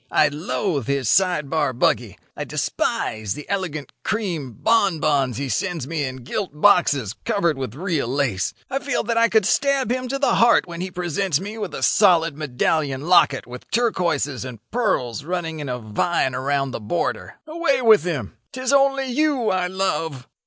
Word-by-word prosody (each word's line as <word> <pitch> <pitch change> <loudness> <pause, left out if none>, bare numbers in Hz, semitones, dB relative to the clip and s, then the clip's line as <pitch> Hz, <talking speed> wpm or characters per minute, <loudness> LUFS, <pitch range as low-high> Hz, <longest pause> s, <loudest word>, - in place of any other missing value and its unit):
'I 150 - +4
loathe 150 - -2
his 140 -3 0
side 180 -4 +2
bar 145 -3 0
buggy; 120 -3 0 0.2
I - - -4
despise 110 -3 -2
the 150 - -9
elegant 175 -7 -3
cream 175 - -3
bonbons 155 - +1
he 140 +1 -3
sends 165 - -2
me 155 0 -2
in 130 -1 -7
gilt 150 - -4
boxes 145 - +4
covered 170 -6 +1
with 130 -2 -5
real 165 -5 -1
lace; 125 -7 0 0.2
I 270 - -2
feel 280 +2 -1
that 230 +1 -1
I 230 0 +4
could 220 -3 +3
stab 275 -2 +1
him 255 0 -1
to 275 +2 -2
the 275 - +2
heart 235 -4 +4
when 170 -1 -7
he 185 - -3
presents 180 -2 -1
me 205 +4 -7
with - - -4
a - - -5
solid 170 -6 +4
medallion 145 +1 -1
locket 140 -7 +4
with 125 0 -11
turquoises 170 - 0
and 130 -3 -7
pearls 150 - -1
running 165 -1 -3
in 145 -2 -5
a 125 - -2
vine 125 +6 0
around 135 +1 -1
the - - -4
border. 115 +11 -3
Away 310 -5 0
with 220 -8 +6
him! 140 - -3 0.2
'Tis 255 +1 -1
only 275 -1 +3
you 265 -2 +1
I 185 -1 0
love. 165 -8 -2
165 Hz, 175 wpm, -22 LUFS, 135-210 Hz, 0.2 s, with